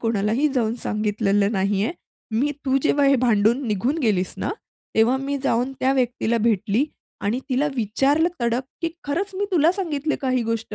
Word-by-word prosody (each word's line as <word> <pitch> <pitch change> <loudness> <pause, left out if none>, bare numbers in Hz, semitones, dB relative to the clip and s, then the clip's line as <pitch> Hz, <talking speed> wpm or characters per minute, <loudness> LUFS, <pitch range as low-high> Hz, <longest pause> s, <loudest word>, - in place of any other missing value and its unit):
कोणालाही 225 +5 +1
जाऊन 230 -3 +1
सांगितलेलं 205 -1 +1
नाही 195 +1 +1
आहे. 290 - -1 0.5
मी 290 +2 +1
तू 265 -1 +2
जेव्हा 290 -2 +3
हे 275 - +5
भांडून 235 +2 +2
निघून 230 - 0
गेलीस 205 - 0
ना, - - -2 0.4
तेव्हा 230 +4 +4
मी 275 +1 -2
जाऊन 245 +3 +1
त्या 265 +1 +3
व्यक्तीला 245 -3 0
भेटली 220 +2 +1 0.4
आणि 225 +5 -1
तिला 275 +2 +1
विचारलं 275 - +2
तडक, 235 +1 +1 0.2
की 335 - +1 0.2
'खरंच 345 +8 -2
मी 395 +2 -1
तुला 335 -2 +4
सांगितले 315 -6 -2
का 265 - -1
ही 255 -1 +1
गोष्ट? 225 -1 -3
245 Hz, 175 wpm, -23 LUFS, 215-280 Hz, 0.5 s, हे